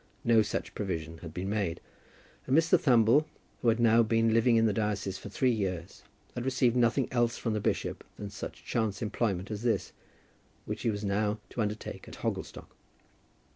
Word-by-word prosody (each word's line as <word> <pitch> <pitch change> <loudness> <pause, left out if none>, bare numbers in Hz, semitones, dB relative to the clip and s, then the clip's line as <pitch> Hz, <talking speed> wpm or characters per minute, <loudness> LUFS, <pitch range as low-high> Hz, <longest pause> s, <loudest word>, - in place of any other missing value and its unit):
No 115 -1 +5
such - - -3
provision 80 -5 -4
had 85 - -8
been 90 +4 -4
made, 100 -5 -1 0.7
and 130 +3 +3
Mr. 165 +2 +4
Thumble, 125 +2 +5 0.4
who - - -1
had 115 0 +4
now 115 0 +5
been 115 0 +2
living 115 +1 +4
in 115 0 +4
the 110 - +2
diocese 100 -2 -2
for - - -8
three 125 +6 +2
years, 95 -5 -3 0.3
had 120 - -4
received 130 -2 +2
nothing 120 +1 +3
else 120 -1 +1
from 115 - -2
the 105 - -1
bishop - - -1
than 100 -1 -6
such 80 -6 -8
chance 110 0 -1
employment 105 -3 -1
as 105 -1 -4
this 110 -7 0 0.7
which - - -4
he - - +1
was 105 -1 -2
now 105 +2 0
to 120 - -2
undertake 105 0 -4
at - - -9
Hogglestock. - - -5
110 Hz, 180 wpm, -30 LUFS, 100-120 Hz, 0.7 s, No